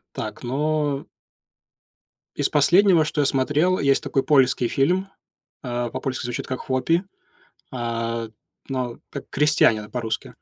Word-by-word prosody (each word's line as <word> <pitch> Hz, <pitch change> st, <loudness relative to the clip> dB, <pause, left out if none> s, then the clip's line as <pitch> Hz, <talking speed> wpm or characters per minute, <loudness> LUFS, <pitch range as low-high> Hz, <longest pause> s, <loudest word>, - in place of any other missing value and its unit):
Так, 105 Hz, -1 st, -5 dB
но 145 Hz, +2 st, -1 dB, 1.3 s
из -, -, +1 dB
последнего, 175 Hz, +3 st, +5 dB
что 155 Hz, 0 st, -2 dB
я -, -, +3 dB
смотрел, 145 Hz, +7 st, +2 dB
есть 140 Hz, -1 st, +2 dB
такой 135 Hz, -, 0 dB
польский 130 Hz, -4 st, +3 dB
фильм, 180 Hz, +10 st, +1 dB, 0.5 s
э, 120 Hz, -2 st, -3 dB
по-польски 130 Hz, 0 st, -3 dB
звучит 120 Hz, 0 st, -4 dB
как 130 Hz, -, -4 dB
"Хуопи", 150 Hz, +7 st, 0 dB, 0.7 s
э, 115 Hz, -1 st, -3 dB, 0.4 s
но 125 Hz, -3 st, -3 dB
как 140 Hz, -, -8 dB
"Крестьянина", 135 Hz, -7 st, +3 dB
по-русски. 115 Hz, -3 st, -4 dB
135 Hz, 120 wpm, -23 LUFS, 120-150 Hz, 1.3 s, последнего